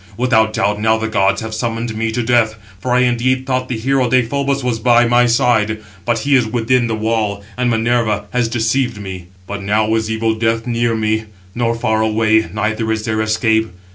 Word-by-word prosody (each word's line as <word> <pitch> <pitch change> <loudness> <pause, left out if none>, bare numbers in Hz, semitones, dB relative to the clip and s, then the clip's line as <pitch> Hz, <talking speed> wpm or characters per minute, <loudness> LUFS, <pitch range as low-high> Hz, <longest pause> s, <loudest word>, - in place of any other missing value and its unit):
without 110 -3 +2
doubt, 105 0 0
now 110 0 +3
the 110 0 -2
gods 95 -3 +1
have 110 0 -6
summoned 115 0 -3
me 110 0 -1
to 120 +2 -2
death. 115 -2 +2 0.2
For 125 - -3
I 125 +1 +4
indeed 125 +1 +1
thought 130 -1 -2
the 125 - -2
hero 130 +2 +1
Deïphobus 135 +3 0
was 120 -3 -1
by 120 +1 +4
my 120 +1 +3
side; 115 -3 +2 0.3
but 120 -1 +1
he 145 - +2
is 125 -4 +3
within 120 +1 +1
the 110 - -1
wall, 110 -2 -1
and 125 0 0
Minerva 115 -2 0
has 125 -2 +1
deceived 120 0 0
me. 95 -3 -7 0.2
But 100 +1 -6
now 105 +2 +1
is 110 -1 0
evil 110 0 0
death 115 0 -1
near 120 -1 0
me, 110 0 -1 0.3
nor 115 -1 0
far 110 -1 0
away, 110 -2 +2
neither 110 +2 -1
is 110 0 -2
there 110 -1 -1
escape. 110 0 +1
115 Hz, 200 wpm, -17 LUFS, 110-120 Hz, 0.3 s, I